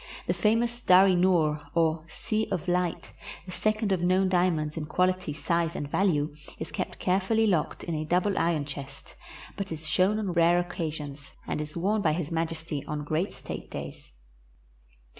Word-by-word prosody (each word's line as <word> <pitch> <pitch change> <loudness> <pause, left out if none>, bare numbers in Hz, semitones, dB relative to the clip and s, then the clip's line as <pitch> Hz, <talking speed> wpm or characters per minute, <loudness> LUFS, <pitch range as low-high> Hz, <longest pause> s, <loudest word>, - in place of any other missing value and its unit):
The - - +1
famous 235 +2 +1
Dar 185 -3 +7
i 190 - +4
noor, 170 -4 +3
or 160 -1 +2
Sea 215 +7 -2
of 185 -1 -2
Light, 180 -1 -1 0.3
the 185 - -8
second 215 +2 0
of 185 -3 +1
known 185 +2 +3
diamonds 175 -5 +1
in 150 -2 -4
qual 180 +3 +3
ity, 185 -4 -3
size, 170 +2 -1
and 145 - -3
value, 155 -6 +1 0.2
is 160 - -6
kept - - -4
carefully 195 +4 +2
locked 170 -7 0
in 170 - -3
a 155 0 -1
double 180 +5 +1
iron 165 -3 +1
chest, 140 -1 -8 0.4
but 195 -2 -5
is 160 -1 -4
shown 185 +6 +3
on 200 -5 -2
rare 170 +1 +4
occasions, 155 -5 -4
and - - -2
is 150 +2 -6
worn 205 +5 +1
by 155 -5 +2
His 165 -1 -3
Majesty 165 -2 -2
on 150 0 -3
great 155 +6 -1
state - - -7
days. - - -8
170 Hz, 180 wpm, -28 LUFS, 155-190 Hz, 0.4 s, Dar